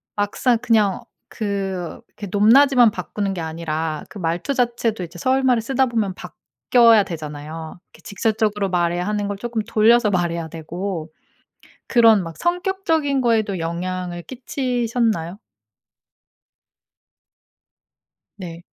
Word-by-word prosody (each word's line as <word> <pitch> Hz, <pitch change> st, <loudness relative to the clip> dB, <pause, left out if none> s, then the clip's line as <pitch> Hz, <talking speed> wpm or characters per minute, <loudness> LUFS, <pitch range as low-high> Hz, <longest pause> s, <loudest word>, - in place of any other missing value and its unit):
막상 210 Hz, +4 st, +1 dB
그냥 215 Hz, -5 st, +2 dB, 0.3 s
그, 195 Hz, -5 st, -4 dB, 0.2 s
그 205 Hz, -, -7 dB
높낮이만 240 Hz, +3 st, +5 dB
바꾸는 195 Hz, +1 st, -3 dB
게 180 Hz, -, -5 dB
아니라 160 Hz, -1 st, -3 dB
그 205 Hz, -, -10 dB
말투 170 Hz, +8 st, -1 dB
자체도 235 Hz, -5 st, 0 dB
이제 175 Hz, 0 st, -9 dB
서울말을 260 Hz, +2 st, +2 dB
쓰다 265 Hz, +2 st, +1 dB
보면 220 Hz, -5 st, -1 dB
바뀌어야 180 Hz, -, +2 dB
되잖아요. 155 Hz, 0 st, -7 dB
이렇게 -, -, -19 dB
직접적으로 210 Hz, -1 st, -1 dB
말해야 175 Hz, 0 st, 0 dB
하는 210 Hz, -1 st, -1 dB
걸 200 Hz, -1 st, -4 dB
조금 235 Hz, 0 st, -3 dB
돌려서 225 Hz, 0 st, +4 dB
말해야 170 Hz, -2 st, -1 dB
되고 165 Hz, +1 st, -5 dB, 0.8 s
그런 225 Hz, -4 st, +5 dB
막 165 Hz, -2 st, -8 dB
성격적인 345 Hz, -6 st, 0 dB
거에도 220 Hz, -5 st, +1 dB
영향을 175 Hz, +1 st, -4 dB
끼치셨나요? 235 Hz, -, -2 dB, 3.0 s
네. 170 Hz, -2 st, -8 dB
205 Hz, 270 characters per minute, -21 LUFS, 175-235 Hz, 3.0 s, 높낮이만